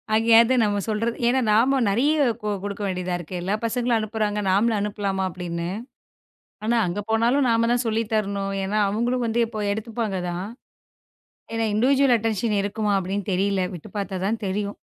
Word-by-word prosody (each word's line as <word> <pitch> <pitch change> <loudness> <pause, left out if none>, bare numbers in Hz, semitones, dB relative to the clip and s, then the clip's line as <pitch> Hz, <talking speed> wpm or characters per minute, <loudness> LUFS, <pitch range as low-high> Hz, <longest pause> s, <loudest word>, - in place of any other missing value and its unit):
அங்கே 225 +1 +1
ஏதோ 245 +3 +2
நம்ம 205 -1 +1
சொல்றது 230 +2 -1
ஏன்னா 255 +2 +3
நாம 255 +6 +4
நெறைய 245 +10 +2 0.5
குடுக்க 205 +1 -5
வேண்டியதா 180 -1 -2
இருக்கு. 175 +1 -6
எல்லா 190 +4 0
பசங்களும் 240 +1 +1
அனுப்புறாங்க. 215 -1 -1
நாமளும் 215 +4 +3
அனுப்பலாமா? 200 -2 -2
அப்படின்னு. 170 -1 -4 1.0
ஆனா 235 +2 +2
அங்க 180 +4 -2
போனாலும் 240 +5 +3
நாம 230 0 +2
தான் 245 +1 +1
சொல்லித் 225 0 -1
தரணும். 200 -2 -1
ஏன்னா 205 +3 -1
அவங்களும் 240 +4 0
வந்து 230 +1 0
இப்போ 220 -2 -5
எடுத்துப்பாங்க 220 -2 -3
தான். 175 +2 -4 1.1
ஏன்னா 225 0 0
இண்டிவிஜுவல் 260 +3 +4
அட்டென்ஷன் 220 -1 0
இருக்குமா 210 +1 -1
அப்படின்னு 195 +1 -3
தெரியல. 195 +1 +1
விட்டுப் 180 +4 -10
பார்த்தாதான் 200 +2 -2
தெரியும். 200 +1 -2
210 Hz, 155 wpm, -24 LUFS, 195-230 Hz, 1.1 s, நாம